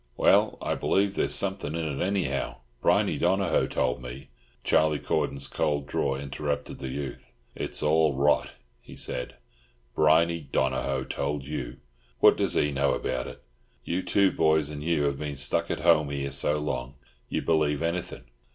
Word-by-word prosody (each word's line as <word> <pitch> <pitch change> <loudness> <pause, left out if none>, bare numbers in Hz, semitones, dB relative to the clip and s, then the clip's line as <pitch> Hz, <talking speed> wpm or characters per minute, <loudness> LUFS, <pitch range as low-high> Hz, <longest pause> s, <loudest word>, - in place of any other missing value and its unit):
"Well, - - +4
I - - 0
believe 100 0 +1
there's - - 0
something 95 -6 -1
in 85 -1 -2
it, 70 -3 -2
anyhow. 95 0 -1 0.3
Briney - - +2
Donohoe 95 -4 +2
told 65 0 -1
me—" 65 +2 -9 0.3
Charlie 75 -1 +3
Cordon's 70 -1 -1
cold 70 -1 -1
drawl 70 -1 -1
interrupted 70 +1 -4
the 65 - -5
youth. 65 -3 -6 0.2
"It's - - -3
all 75 -1 +3
rot," 70 +2 +2 0.3
he - - -13
said. 60 - -4 0.6
"Briney 80 +2 +4
Donohoe 65 -1 -1
told 70 +1 -3
you—what - - 0
does - - -1
he 75 - +2
know 70 0 +1
about 65 -1 -2
it? - - -11 0.4
You 90 +2 -1
two 95 +2 +3
boys 80 -2 +2
and 75 -1 -6
Hugh 80 -1 +1
have 70 -1 0
been 75 -1 -4
stuck 70 +1 0
at - - -2
home 80 -3 +4
here 70 -1 -3
so 70 +2 +1
long, 65 -3 -3 0.3
you - - -2
believe 75 -2 +1
anything. 85 -6 -3
75 Hz, 160 wpm, -27 LUFS, 70-80 Hz, 0.6 s, Well